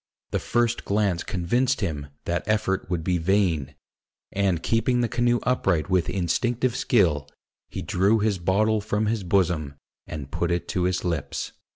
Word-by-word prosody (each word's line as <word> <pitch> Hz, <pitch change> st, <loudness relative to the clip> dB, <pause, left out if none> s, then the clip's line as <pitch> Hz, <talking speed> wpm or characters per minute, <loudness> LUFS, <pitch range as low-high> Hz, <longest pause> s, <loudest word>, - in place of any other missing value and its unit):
The -, -, 0 dB
first 120 Hz, 0 st, 0 dB
glance 100 Hz, -4 st, +1 dB
convinced 120 Hz, +9 st, 0 dB
him 75 Hz, -7 st, -2 dB, 0.2 s
that 85 Hz, 0 st, 0 dB
effort 105 Hz, -4 st, 0 dB
would 85 Hz, -3 st, -1 dB
be 90 Hz, 0 st, +1 dB
vain; 85 Hz, -5 st, +1 dB, 0.6 s
and 95 Hz, -4 st, 0 dB
keeping 120 Hz, +2 st, +2 dB
the 120 Hz, -, +1 dB
canoe 120 Hz, +1 st, +1 dB
upright 95 Hz, -9 st, +1 dB
with 90 Hz, -3 st, +2 dB
instinctive 120 Hz, +7 st, 0 dB
skill, 85 Hz, -, +2 dB, 0.4 s
he -, -, -5 dB
drew 100 Hz, +5 st, +2 dB
his 105 Hz, -3 st, 0 dB
bottle 105 Hz, +5 st, +2 dB
from 105 Hz, +1 st, -1 dB
his 110 Hz, -1 st, -1 dB
bosom, 85 Hz, -6 st, +1 dB, 0.3 s
and 70 Hz, -3 st, -7 dB
put 85 Hz, -, -1 dB
it 85 Hz, 0 st, -1 dB
to 90 Hz, -1 st, 0 dB
his 90 Hz, 0 st, -1 dB
lips. 80 Hz, -6 st, -2 dB
95 Hz, 160 wpm, -25 LUFS, 85-110 Hz, 0.6 s, keeping